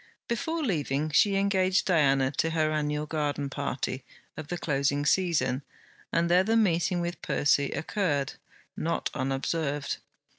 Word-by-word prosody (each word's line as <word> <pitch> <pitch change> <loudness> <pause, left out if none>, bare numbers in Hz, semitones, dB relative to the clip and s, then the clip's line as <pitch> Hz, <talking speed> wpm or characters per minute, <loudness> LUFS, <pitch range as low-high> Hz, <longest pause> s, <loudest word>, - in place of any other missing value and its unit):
Before 320 +8 -2
leaving, 155 - -1
she 200 +6 +4
engaged 190 -1 +2
Diana 135 -6 +3
to 165 - +2
her 155 -1 +1
annual 150 0 -1
garden 145 -2 -2
party 135 -2 -3 0.3
of 155 -1 -7
the 175 - -3
closing 140 -2 0
season, 160 -8 +2 0.5
and 170 0 +2
there 180 +2 +4
the 225 +3 +2
meeting 175 -4 +2
with 175 +1 -4
Percy 140 -1 +2
occurred, 145 -3 -1 0.4
not 170 +1 -2
unobserved. 140 +2 -2
155 Hz, 135 wpm, -28 LUFS, 140-180 Hz, 0.5 s, she